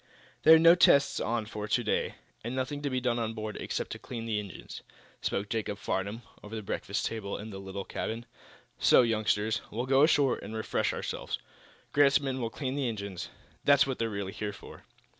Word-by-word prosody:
"There 160 +1 +9
are - - +8
no 165 +1 +8
tests 140 -5 +5
on 115 -1 -1
for 105 -1 -5
to 120 +3 +1
day, 110 - 0 0.3
and 120 +3 -4
nothing 135 +3 -2
to 145 - -1
be 130 -1 0
done 120 -1 0
on 115 -1 -2
board, 110 -1 -4
except - - -3
to - - -5
clean 115 -3 -6
the 110 -2 0
engines," 100 -4 -8 0.4
spoke 100 +1 -1
Jacob 105 -2 -2
Farnum 100 +4 -3 0.2
over 105 +2 -8
the 110 - -4
breakfast 100 +2 -2
table 105 -3 -3
in 110 +1 -7
the 95 - -7
little 95 0 -6
cabin. 115 +2 -4 0.5
"So, - - +6
youngsters, 110 -1 +1
we'll 120 +4 -3
go 135 +1 +4
ashore 145 -3 +4
and 105 +3 -7
refresh 110 - 0
ourselves. - - -4 0.6
Grant's 140 -1 +5
men 135 -2 -3
will 115 - -1
clean 130 +2 -3
the 140 -2 -1
engines. 100 -5 -5 0.3
That's 140 -1 +6
what 135 -2 -3
they're 115 - 0
really 100 -2 -4
here 105 -1 -4
for." 100 - -12
115 Hz, 200 wpm, -30 LUFS, 105-130 Hz, 0.6 s, There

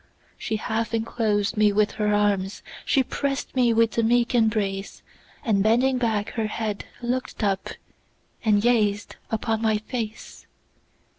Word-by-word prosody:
She 220 - -3
half 220 +1 -2
enclosed 220 -2 0
me 210 -1 +5
with 210 0 +2
her 210 -1 0
arms, 205 -2 0 0.2
She 270 - +3
press'd 275 +2 -3
me 245 -2 +4
with 230 0 +2
a - - +5
meek 240 +2 +2
embrace; 210 -4 0 0.4
And 205 -4 +2
bending 245 +5 +3
back 220 -4 0
her 225 -2 -2
head, 215 -1 -3 0.2
look'd 245 -1 -2
up, 195 -2 0 0.7
And 210 -2 +3
gazed 210 -4 +1
upon 225 0 -1
my 220 -1 +2
face. 220 0 -6
220 Hz, 140 wpm, -24 LUFS, 210-235 Hz, 0.7 s, me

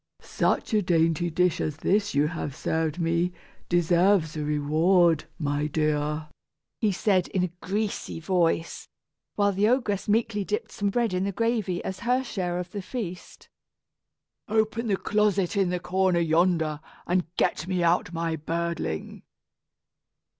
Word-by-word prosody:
"Such - - 0
a 215 - +4
dainty 165 -1 +2
dish 180 +1 +1
as 150 -1 -2
this 205 +2 +1
you 145 +1 +3
have 155 -5 -5
served 160 -1 -1
me 170 +1 +1 0.4
deserves 175 -1 +3
a 155 - -2
reward, 155 +3 +3
my 145 -1 -1
dear," 150 0 -1 0.5
he 215 -3 +2
said 190 -1 +1
in 185 - -1
a 180 - -2
greasy 205 -3 -3
voice, 165 -1 0 0.5
while 200 -1 +3
the 200 +2 +2
ogress 235 -6 0
meekly 215 -1 +1
dipped 210 +2 -3
some 200 -1 -1
bread 230 0 0
in 185 +1 0
the 200 - -1
gravy 220 -4 -1
as 190 0 -5
her 250 +2 +1
share 180 -7 -3
of 180 0 -5
the 205 - -4
feast. 185 -4 -7 1.0
"Open 220 +2 0
the 200 -3 +1
closet 205 -2 +1
in 195 -3 +2
the 180 0 -1
corner 185 0 +1
yonder, 165 -2 +2 0.3
and 180 -1 0
get 160 - 0
me 180 -2 0
out 170 0 +2
my 165 -1 -2
birdling." 165 - -3
180 Hz, 145 wpm, -26 LUFS, 165-200 Hz, 1.0 s, a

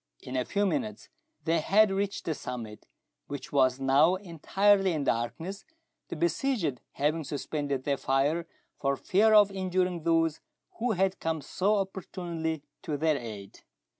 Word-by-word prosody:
In 130 - -6
a 125 -1 0
few 205 0 0
minutes 215 -1 -2 0.4
they 165 0 +2
had 205 +5 +4
reached 200 +1 -2
the 160 - 0
summit, 120 -6 -7 0.4
which 140 -1 -7
was 130 -2 +3
now 140 +6 +4
entirely 195 +2 +2
in 150 -3 -1
darkness, 160 - -2 0.4
the - - -5
besieged 170 - 0
having 155 +3 0
suspended 140 -1 -3
their 140 0 0
fire 145 +6 +1 0.3
for 140 -1 0
fear 215 +2 +4
of 205 -1 +7
injuring 185 -2 -1
those 165 -1 +2 0.4
who 240 0 +1
had 190 0 +1
come 160 -1 -1
so 190 +8 0
opportunely 170 -5 -3 0.2
to 150 -2 -3
their 155 0 +2
aid. 105 -6 -8
165 Hz, 145 wpm, -29 LUFS, 140-195 Hz, 0.4 s, of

